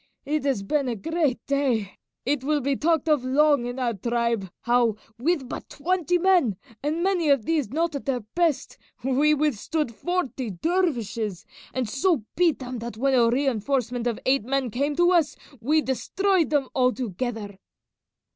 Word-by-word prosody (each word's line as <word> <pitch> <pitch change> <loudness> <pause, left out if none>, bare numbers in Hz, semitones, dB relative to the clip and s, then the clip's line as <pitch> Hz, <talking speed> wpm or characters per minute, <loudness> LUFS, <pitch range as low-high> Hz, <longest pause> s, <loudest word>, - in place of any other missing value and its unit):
it 300 +1 -1
has 265 -8 0
been 280 +6 0
a 240 - -1
great 310 - 0
day; 255 -8 0 0.3
it 275 0 0
will 300 +2 +1
be 275 0 0
talked 320 +1 +1
of 300 -5 +3
long 280 -1 +3
in 245 +1 -5
our 245 -3 0
tribe, 235 -1 -1
how, 240 -2 +2 0.2
with 295 0 0
but - - -7
twenty 355 +2 0
men, 350 - +3 0.2
and 310 +4 -1
many 365 -5 +1
of 275 -6 +3
these 310 -9 0
not 330 +4 0
at 280 - -5
their 255 -3 0
best, 335 -5 0 0.2
we 280 +4 +3
withstood 300 -1 -1
forty 275 -5 -2
dervishes, 230 - -1 0.3
and 255 -3 -2
so 275 - +1
beat 335 -5 +3
them 250 -2 -6
that 235 -1 -6
when 270 +3 +1
a 235 -2 +5
reinforcement 245 -1 0
of 235 - -1
eight 265 -3 +3
men 260 0 -1
came 285 +6 -1
to 350 +2 +4
us 335 -5 +2 0.2
we 300 +7 +2
destroyed 355 - +1
them 285 -3 +1
altogether." 240 - -1
270 Hz, 165 wpm, -25 LUFS, 240-310 Hz, 0.3 s, a